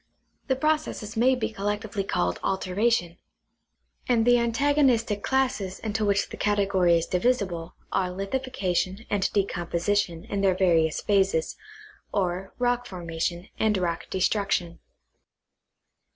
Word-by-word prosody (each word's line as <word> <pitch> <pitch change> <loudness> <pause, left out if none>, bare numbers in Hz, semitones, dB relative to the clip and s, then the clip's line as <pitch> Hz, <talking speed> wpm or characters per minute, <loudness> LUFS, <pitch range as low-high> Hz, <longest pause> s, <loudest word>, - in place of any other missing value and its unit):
The 265 - +2
pro 305 +4 +2
cesses 225 -7 -7
may 250 +3 +4
be 240 -2 -2
collectively 205 0 -2
called 90 - -1
altei 190 -1 -2
ation; 175 -8 +2 0.9
and 230 -2 +3
the 245 0 +5
antagonistic 235 -3 +2
classes 250 -8 0
into 220 0 -2
which 200 -1 +1
the - - -8
category 195 -4 +3
is 165 - -1
divisible 180 -5 -1 0.2
are 185 -1 +1
lithifactioti 195 -1 -2
and 205 -2 +1
decomposition 175 -2 0
in 200 - -2
their 190 -2 +3
various 165 -4 +2
phases, 195 -5 +1 0.6
or 185 0 -1
roek 245 0 0
formation 170 -1 -4
and 215 -2 +2
rock 175 -2 -2
destruction. 190 -2 0
200 Hz, 125 wpm, -26 LUFS, 180-230 Hz, 0.9 s, the